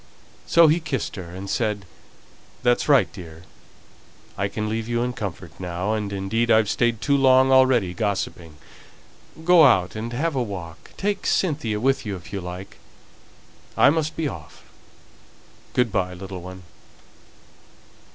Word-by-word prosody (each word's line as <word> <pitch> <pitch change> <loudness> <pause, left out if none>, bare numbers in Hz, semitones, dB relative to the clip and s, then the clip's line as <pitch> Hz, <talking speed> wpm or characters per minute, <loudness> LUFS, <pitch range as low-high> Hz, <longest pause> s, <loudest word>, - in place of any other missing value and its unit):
So 170 -1 +6
he 155 +3 +3
kissed 155 -7 -3
her, 90 -3 -8
and 95 +3 -8
said, 105 -2 -1 0.8
"That's 120 +4 +2
right, 135 -9 +4
dear! 80 -3 -11 0.9
I 100 - -1
can 105 +2 -4
leave 110 +1 -3
you 120 0 0
in 125 0 -2
comfort 95 -6 -6
now, 90 +3 -2
and 105 -2 -3
indeed 100 +4 -1
I've 110 -2 +4
stayed 120 -2 0
too 140 - +2
long 130 -1 +5
already 130 -8 +4
gossiping. 95 -6 -3 0.9
Go 175 -2 +7
out 90 -10 +4
and 115 +2 -4
have 155 +7 -1
a 130 - 0
walk 90 -8 -7
take 205 +1 -2
Cynthia 145 - 0
with 135 +4 +1
you, 105 -4 -4
if 90 +2 -12
you 100 - -3
like. 90 +2 -8 1.0
I - - +6
must 155 0 -1
be 160 - -1
off. - - -9 1.1
Good 125 -3 +2
by, 90 -2 -1
little 95 0 -8
one." 95 +1 -10
110 Hz, 150 wpm, -23 LUFS, 95-130 Hz, 1.1 s, Go